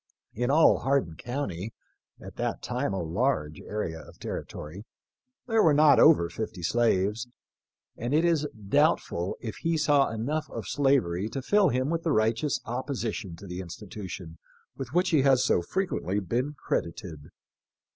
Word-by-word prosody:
In 120 Hz, +3 st, -1 dB
all 155 Hz, +3 st, +5 dB
Hardin 135 Hz, -12 st, 0 dB
county 115 Hz, -, -4 dB, 0.2 s
— -, -, -42 dB
at -, -, -10 dB
that -, -, -2 dB
time 125 Hz, -1 st, -1 dB
a 95 Hz, -3 st, -2 dB
large 80 Hz, -, -1 dB
area 85 Hz, -6 st, -4 dB
of -, -, -15 dB
territory 85 Hz, +7 st, -6 dB, 0.3 s
— 255 Hz, +1 st, -58 dB
there 225 Hz, -2 st, +3 dB
were 155 Hz, -6 st, +5 dB
not 150 Hz, -1 st, +6 dB
over 150 Hz, -, +6 dB
fifty 90 Hz, 0 st, -6 dB
slaves; 110 Hz, +2 st, +1 dB, 0.7 s
and 120 Hz, +2 st, -4 dB
it 155 Hz, +3 st, +3 dB
is 160 Hz, -3 st, +2 dB, 0.2 s
doubtful 140 Hz, -, +1 dB
if 110 Hz, -3 st, -6 dB
he 165 Hz, 0 st, 0 dB
saw 145 Hz, -2 st, +3 dB
enough 130 Hz, +8 st, -2 dB
of -, -, -6 dB
slavery 115 Hz, -, +1 dB
to 135 Hz, +2 st, -5 dB
fill 205 Hz, +4 st, +4 dB
him 130 Hz, +4 st, 0 dB
with 165 Hz, 0 st, 0 dB
the 165 Hz, -, 0 dB
righteous 115 Hz, +6 st, +1 dB
opposition 120 Hz, -, -3 dB
to 90 Hz, -, -12 dB
the 90 Hz, -1 st, -6 dB
institution 95 Hz, -1 st, -8 dB, 0.4 s
with 130 Hz, -3 st, -6 dB
which 180 Hz, +4 st, +2 dB
he 155 Hz, -4 st, +4 dB
has 130 Hz, -2 st, +4 dB
so -, -, +3 dB
frequently 105 Hz, -, -1 dB
been 125 Hz, -, -2 dB
credited. 85 Hz, -, -4 dB
120 Hz, 160 wpm, -27 LUFS, 95-145 Hz, 0.7 s, not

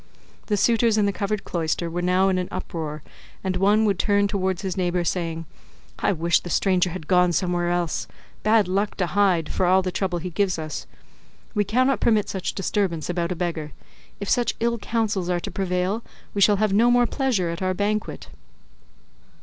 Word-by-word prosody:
The 210 Hz, -, +1 dB
suitors 230 Hz, +1 st, +3 dB
in 210 Hz, -, +3 dB
the 200 Hz, -, 0 dB
covered 200 Hz, +1 st, -2 dB
cloister 170 Hz, 0 st, -2 dB
were 170 Hz, +1 st, -3 dB
now 180 Hz, +2 st, +3 dB
in 185 Hz, -1 st, +1 dB
an 180 Hz, -, -2 dB
uproar, 155 Hz, -5 st, -5 dB, 0.4 s
and 190 Hz, -1 st, -1 dB
one 205 Hz, +4 st, +3 dB
would 200 Hz, -4 st, +1 dB
turn 205 Hz, -1 st, +3 dB
towards 190 Hz, -1 st, -1 dB
his 190 Hz, -2 st, -2 dB
neighbour, 180 Hz, -1 st, 0 dB
saying, 165 Hz, -2 st, -2 dB, 0.5 s
"I -, -, +2 dB
wish 170 Hz, -2 st, +2 dB
the 175 Hz, -, -8 dB
stranger 185 Hz, 0 st, +2 dB
had 170 Hz, -2 st, -7 dB
gone 180 Hz, -1 st, +4 dB
somewhere 175 Hz, 0 st, 0 dB
else, 175 Hz, -2 st, -1 dB, 0.3 s
bad 215 Hz, -2 st, +3 dB
luck 200 Hz, +3 st, 0 dB
to 185 Hz, -, +1 dB
him, 180 Hz, -1 st, +2 dB
for 180 Hz, -, 0 dB
all 185 Hz, +1 st, +4 dB
the 185 Hz, -, -2 dB
trouble 185 Hz, -1 st, -1 dB
he 180 Hz, +2 st, -5 dB
gives 190 Hz, 0 st, 0 dB
us. 155 Hz, -2 st, -5 dB, 0.7 s
We 210 Hz, -2 st, +2 dB
cannot 255 Hz, +6 st, +2 dB
permit 215 Hz, -3 st, +2 dB
such 190 Hz, -2 st, -3 dB
disturbance 185 Hz, -4 st, -1 dB
about 170 Hz, 0 st, -2 dB
a -, -, -1 dB
beggar; 160 Hz, -4 st, -3 dB, 0.5 s
if 200 Hz, -, -5 dB
such 245 Hz, +1 st, +1 dB
ill 235 Hz, 0 st, 0 dB
counsels 210 Hz, -5 st, -1 dB
are 175 Hz, -1 st, +1 dB
to -, -, -6 dB
prevail 185 Hz, +3 st, -1 dB, 0.3 s
we 200 Hz, -, -1 dB
shall 205 Hz, +2 st, +6 dB
have 210 Hz, 0 st, +1 dB
no 230 Hz, +4 st, +5 dB
more 245 Hz, 0 st, +4 dB
pleasure 235 Hz, -, 0 dB
at 170 Hz, -, -6 dB
our 185 Hz, 0 st, 0 dB
banquet." 210 Hz, +2 st, -2 dB
185 Hz, 190 wpm, -24 LUFS, 175-205 Hz, 0.7 s, shall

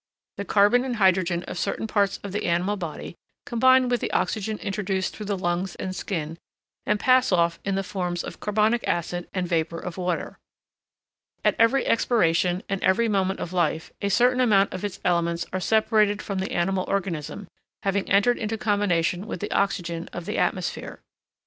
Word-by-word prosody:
The 200 Hz, -, -4 dB
carbon 205 Hz, +6 st, +4 dB
and 255 Hz, -2 st, -2 dB
hydrogen 185 Hz, -4 st, +2 dB
of -, -, -6 dB
certain -, -, -2 dB
parts 200 Hz, -3 st, +1 dB
of 200 Hz, -, -5 dB
the 205 Hz, -, -2 dB
animal 175 Hz, +4 st, +1 dB
body 170 Hz, -5 st, -6 dB, 0.3 s
combine 260 Hz, +2 st, +4 dB
with 245 Hz, -1 st, 0 dB
the -, -, -2 dB
oxygen 210 Hz, +3 st, -1 dB
introduced 195 Hz, -2 st, -2 dB
through 210 Hz, -, -7 dB
the 200 Hz, -1 st, -1 dB
lungs 175 Hz, +1 st, -2 dB
and 185 Hz, 0 st, -5 dB
skin, 165 Hz, -4 st, -4 dB, 0.5 s
and 210 Hz, 0 st, +2 dB
pass 255 Hz, 0 st, +4 dB
off 170 Hz, -2 st, +2 dB
in 195 Hz, -1 st, -1 dB
the 195 Hz, -, -1 dB
forms 180 Hz, -2 st, -3 dB
of -, -, -8 dB
carbonic 215 Hz, +3 st, +1 dB
acid 175 Hz, +1 st, -2 dB
and 185 Hz, -2 st, -2 dB
vapour 165 Hz, -1 st, -1 dB
of 180 Hz, +1 st, -6 dB
water. 180 Hz, -2 st, -3 dB, 1.1 s
At -, -, +4 dB
every 230 Hz, +4 st, +4 dB
expiration 180 Hz, -6 st, +2 dB
and 195 Hz, -1 st, -3 dB
every 225 Hz, +5 st, +3 dB
moment 195 Hz, -2 st, 0 dB
of 175 Hz, -, -5 dB
life, 160 Hz, -2 st, 0 dB
a 200 Hz, -, 0 dB
certain 250 Hz, +4 st, +3 dB
amount 205 Hz, -5 st, +3 dB
of 185 Hz, -, -6 dB
its 200 Hz, -1 st, -4 dB
elements 170 Hz, -1 st, +1 dB
are 185 Hz, -, 0 dB
separated 215 Hz, +1 st, +2 dB
from 200 Hz, -2 st, -4 dB
the 190 Hz, -, -3 dB
animal 185 Hz, +2 st, 0 dB
organism, 195 Hz, -1 st, -3 dB, 0.4 s
having 195 Hz, 0 st, 0 dB
entered 205 Hz, +5 st, +3 dB
into 220 Hz, 0 st, -2 dB
combination 200 Hz, -3 st, 0 dB
with -, -, -5 dB
the 205 Hz, -, -5 dB
oxygen 175 Hz, -4 st, -1 dB
of 175 Hz, -, -6 dB
the 210 Hz, -, -2 dB
atmosphere. -, -, -2 dB
195 Hz, 180 wpm, -25 LUFS, 175-210 Hz, 1.1 s, carbon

